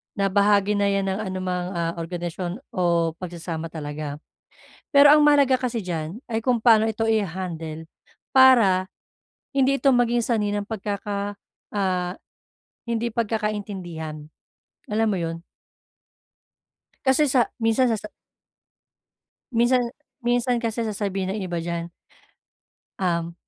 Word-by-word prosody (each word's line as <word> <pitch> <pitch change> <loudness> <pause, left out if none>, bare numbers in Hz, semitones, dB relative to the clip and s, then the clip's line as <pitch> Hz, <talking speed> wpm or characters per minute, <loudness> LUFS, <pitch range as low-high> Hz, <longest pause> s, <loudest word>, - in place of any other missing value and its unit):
na 200 -1 +1
bahagi 205 0 +3
na 200 - +2
yan 195 0 0
ng 190 - -2
anumang 185 -1 -3
ah 170 0 -1
organisasyon 175 +3 -4
o 170 -3 +2
pagsasama 170 -2 -5
talaga. 145 -1 -5 0.8
Pero 285 +1 +9
ang 300 - +5
mahalaga 280 -3 +5
kasi 240 -3 -2
diyan 170 +4 -4
ay 225 0 0
kung 250 -2 +2
paano 220 -1 +5
ito 220 +1 -2
iha-handle 170 -6 -2 0.5
para 230 -9 +6 0.7
hindi 275 0 +3
ito 275 - +4
maging 240 -1 +2
sanhi 215 -4 0
ng 205 0 -2
pagkaka 205 -1 -3 0.4
ah 185 -2 0 0.8
hindi 235 0 0
pagkakaintindihan 200 -9 -3 0.6
alam 220 +1 +2
mo 195 - 0
yun. 165 0 -3 1.7
Kasi 265 +3 +4
sa, 250 -2 +2
minsan 230 +2 +2
sa 220 - 0
sa. 210 - -8 1.4
Minsan, 240 0 +2 0.3
minsan 245 0 +1
kasi 230 0 -1
sasabihin 195 -2 -2
ng 215 - -4
iba 175 -2 -3
diyan. 170 0 -4 1.1
Uhm, 170 -2 0
200 Hz, 120 wpm, -24 LUFS, 175-230 Hz, 1.7 s, Pero